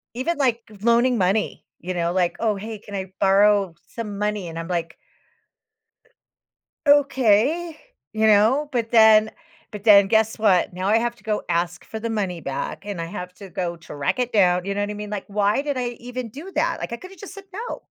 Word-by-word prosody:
Even, 310 +7 -1
like, 245 -4 +1 0.2
loaning 235 +2 +3
money, 195 +2 0
you 185 +1 -4
know, 170 0 0
like, 180 -2 +1
"Oh, 220 -2 +1
hey, 215 +2 -6
can 205 0 -13
I 190 -1 -5
borrow 200 -1 +4
some 210 -3 -6
money?" 210 -3 -2
And 165 0 -6
I'm 165 - -6
like 170 -2 -3 1.9
"Okay," 285 +3 +3 0.4
you 220 0 +2
know, 220 +8 +4
but 230 -2 -1
then, 220 -2 +6 0.4
but 210 -2 -8
then 200 -3 +7
guess 220 +2 +2
what? 195 -5 +2
Now 185 +2 -3
I 220 - +5
have 235 +1 -1
to - - -23
go 215 -2 -1
ask 175 +1 -1
for 220 - -7
the 230 +1 -4
money 190 -6 -2
back, 140 +6 -5
and 200 -4 -5
I - - -3
have 180 0 -7
to 195 0 -11
go 175 0 -3
track 145 - -3
it 250 -1 -1
down, 180 -3 +3
you 200 - -2
know 205 - -1
what 205 - -2
I 210 - -3
mean, 210 0 -7
like, 210 -2 -4
why 205 +4 +1
did 285 -2 -3
I 245 -1 -1
even 245 0 -6
do 300 - -10
that, - - 0
like, - - -5
I 235 - -3
could 370 +7 -12
have 385 - -15
just 400 - -9
said 395 -1 -11
no. 450 +5 -6
210 Hz, 210 wpm, -23 LUFS, 190-240 Hz, 1.9 s, then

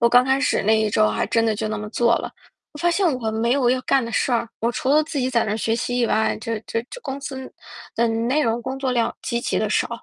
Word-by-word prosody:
我 235 - +5
刚 245 +1 +6
开 265 +1 +2
始 - - +1
那 220 +1 +4
一 215 -1 +1
周 105 - +3
还 105 -1 -1
真 230 0 +1
的 220 - +1
就 215 +1 -3
那 215 -1 -3
么 210 - -6
做 235 +1 +3
了， - - -5 0.4
我 295 - -11
发 345 +3 +2
现 370 +3 +2
我 220 -2 -1
没 225 +2 0
有 260 -3 +3
要 255 0 +1
干 260 -1 +2
的 230 - -5
事 250 - +1
儿， 235 -1 0
我 230 - +1
除 255 - -3
了 305 +2 +5
自 310 -2 -4
己 255 0 0
在 235 -2 +2
那 215 0 -1
学 225 +1 0
习 245 +1 -2
以 240 - +2
外， 220 0 +1
这 225 0 -3
这 230 - -2
这 - - -8
公 275 0 -5
司 265 -2 -7 0.4
的 235 - +2
内 235 +6 +1
容 230 -1 0
工 265 +2 -4
作 270 -1 -1
量 235 -2 0
极 235 -1 -2
其 - - -1
地 - - 0
少。 - - +1
235 Hz, 310 characters per minute, -22 LUFS, 225-265 Hz, 0.4 s, 刚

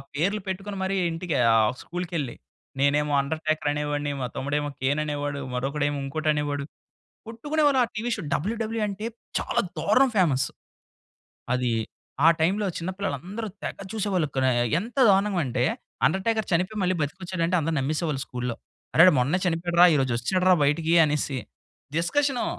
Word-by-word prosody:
పేర్లు 200 +8 0
పెట్టుకొని 195 +1 -4
మరి 190 +1 -1 0.2
ఇంటికి, 165 -2 -3 0.2
ఆహ్, 110 -1 +4
స్కూల్‌కెళ్ళి. 170 -6 -4 0.4
నేనేమో 145 +1 +2
'అండర్టేకర్' 155 +1 -1
అనేవాడిని, 145 0 -2
మా 125 - -1
తమ్ముడేమో 145 +2 -1
'కేన్' 140 +3 +1
అనేవాడు, 145 -1 -3
మరొకడేమో 145 +3 -1
ఇంకోటనేవాడు, 145 0 -1 0.6
కొట్టుకునేవాళ్ళం. 290 +3 +1
ఆ - - -11
టీవీ 230 +3 -2
షో 210 - -6
డబల్యుడబల్యుఈ 225 +4 -1
అంటే 205 +2 -5 0.3
చాలా - - 0 0.2
దారుణం 245 - +3
ఫేమస్. 135 -8 +3 1.1
అది 125 -1 0 0.5
ఆ - - +9
టైమ్‌లో 195 +5 +2
చిన్న 170 +2 -4
పిల్లలందరూ 200 - -4 0.2
తెగ - - -4 0.2
చూసేవాళ్ళు. 195 -7 0
క - - -4 0.4
ఎంత 230 +7 -8
దారుణంగా 195 -2 +3
అంటే 125 0 -1 0.4
'అండర్టేకర్' 215 +6 +1
చనిపోయి, 185 +5 0
మళ్ళీ 185 0 +1
బ్రతికొచ్చాడంటే 175 +3 -2
అందరూ 160 +1 -1
నమ్మేసేవాళ్ళు 150 +1 -1
స్కూల్‌లో. 125 -1 -4 0.4
"అరే! 175 +3 +8
మొన్నే 140 +8 +2
చనిపోయాడు 170 0 -1
రా! - - +11
ఈ - - +3
రోజు 130 -3 0
వచ్చాడు 180 +10 0
రా 185 - +7
బయటికి" 160 +3 +1
అనేసి 150 -2 -1 0.6
డిస్కషను. 270 +10 +1
165 Hz, 140 wpm, -25 LUFS, 145-195 Hz, 1.1 s, రా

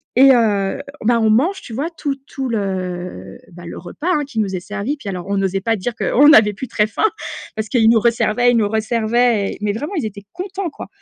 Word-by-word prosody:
et 270 +2 +7
heu, 210 0 +1 0.2
ben, 235 0 +3
on 220 -1 +3
mange, 310 - +2
tu 230 - -10
vois, 285 +8 -2
tout 285 -3 -2
tout 265 -3 -5
le, 180 - -4
bah, 175 0 -12
le - - -7
repas, 180 - -7
hein, 295 -3 +1
qui 250 -5 -5
nous 195 -3 -1
est - - -2
servi. 210 +9 -4
Puis 250 - -11
alors, 180 -2 -5
on 200 0 -1
n'osait 195 0 0
pas 225 +2 +1
dire 225 +4 -3
qu'on 280 +5 +4
n'avait 215 -7 +6
plus 250 +6 -6
très 210 -1 +1
faim 220 - -3 0.5
parce 220 0 -4
qu'ils 230 -4 +3
nous 225 -1 +6
resservaient, 235 +1 +2
ils 240 - +2
nous 210 -2 +2
resservaient 220 0 +1
et - - -8
mais 205 -1 0
vraiment 295 - -5
ils 295 -10 -1
étaient 200 -1 -7
contents, 375 0 -4
quoi - - -9
220 Hz, 235 wpm, -19 LUFS, 200-255 Hz, 0.5 s, et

